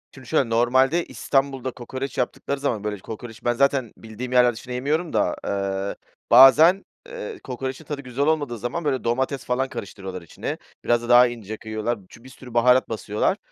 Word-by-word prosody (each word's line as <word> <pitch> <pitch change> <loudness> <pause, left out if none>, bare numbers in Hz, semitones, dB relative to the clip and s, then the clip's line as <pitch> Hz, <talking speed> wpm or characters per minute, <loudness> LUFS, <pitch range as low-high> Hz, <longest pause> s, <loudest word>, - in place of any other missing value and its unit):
Şimdi 130 -2 -13
şöyle, 140 -7 +1
normalde 130 +8 +3
İstanbul'da 135 -2 -1
kokoreç 130 +3 -6
yaptıkları 135 +2 -2
zaman 120 -7 -1
böyle 105 -2 -3
kokoreçi 115 +3 -9
ben 120 - +3
zaten 135 -2 +1
bildiğim 115 +3 -8
yerler 125 -1 +5
dışında 125 +3 -8
yemiyorum 155 +7 -1
da, - - +1
ııı, 100 0 -2 0.4
bazen, 155 +10 +8 0.2
eee, 480 -4 -7
kokoreçin 130 +4 -5
tadı 145 -1 -5
güzel 130 +2 -2
olmadığı 145 -7 0
zaman 120 +9 -4
böyle 135 -3 0
domates 130 +3 -1
falan 130 +1 0
karıştırıyorlar 95 -2 -7
içine. 85 - -6 0.3
Biraz 120 0 +2
da 120 - -7
daha 125 +1 +8
ince 110 -3 -7
kıyıyorlar. 110 +1 -3
Çü 115 - -16
bir 130 - -12
sürü 125 -2 -13
baharat 125 +2 +4
basıyorlar. 110 - -1
125 Hz, 175 wpm, -23 LUFS, 115-135 Hz, 0.4 s, bazen